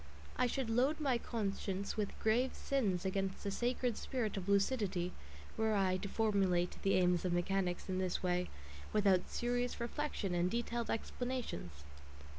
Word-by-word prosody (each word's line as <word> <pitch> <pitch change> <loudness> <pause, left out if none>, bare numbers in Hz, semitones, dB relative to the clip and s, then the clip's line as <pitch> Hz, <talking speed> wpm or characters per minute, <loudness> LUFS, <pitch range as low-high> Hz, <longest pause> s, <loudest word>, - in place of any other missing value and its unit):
I 250 - +3
should 255 0 -1
load 265 +7 +3
my 265 -5 +2
conscience 200 -4 -2
with 210 -2 -2
grave 240 +4 +2
sins 200 -10 0
against 190 0 -1
the 200 - -1
sacred 245 +1 0
spirit 240 -6 -2
of 195 0 -4
lucidity 200 -3 +2 0.4
were 220 -1 +2
I 190 -2 +3
to 200 - -5
formulate 195 -5 +2
the 195 - +3
aims 180 -2 +3
of 180 -2 0
mechanics 180 0 0
in 185 -1 -1
this 185 -1 -1
way, 180 0 +1 0.4
without 195 -4 +3
serious 245 +1 -1
reflection 235 -5 -2
and 175 +1 +2
detailed 235 +1 -2
explanations. 230 - -3
200 Hz, 150 wpm, -36 LUFS, 185-240 Hz, 0.4 s, I